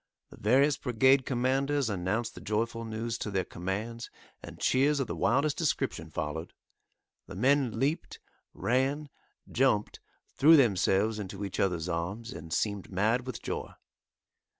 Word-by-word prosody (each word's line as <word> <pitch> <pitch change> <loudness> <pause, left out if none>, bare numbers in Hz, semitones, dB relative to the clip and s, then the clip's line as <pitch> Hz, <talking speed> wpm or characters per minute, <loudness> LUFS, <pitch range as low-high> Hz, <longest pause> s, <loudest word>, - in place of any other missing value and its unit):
The - - -13
various 135 +7 +3
brigade 130 +2 +3
commanders 135 +2 +1
announced 100 +3 -2
the - - -11
joyful 115 +2 -2
news 115 +1 -4
to - - -3
their 95 -2 0
commands, 105 +8 -4 0.3
and - - -10
cheers 140 +3 +2
of 135 - 0
the - - -5
wildest 140 +5 +1
description 80 - -1
followed. 80 +1 -4 0.7
The 95 - -9
men 130 +3 +2
leaped, 145 +5 -1 0.4
ran, 135 +8 0 0.4
jumped, 120 -5 +1 0.4
threw 160 +3 +7
themselves 105 -3 +2
into 100 0 -5
each 95 - -5
other's 90 -4 0
arms 90 +7 -3
and 80 0 -9
seemed 100 +1 -1
mad 110 +7 +1
with 130 - -6
joy. - - -4
115 Hz, 140 wpm, -29 LUFS, 95-135 Hz, 0.7 s, threw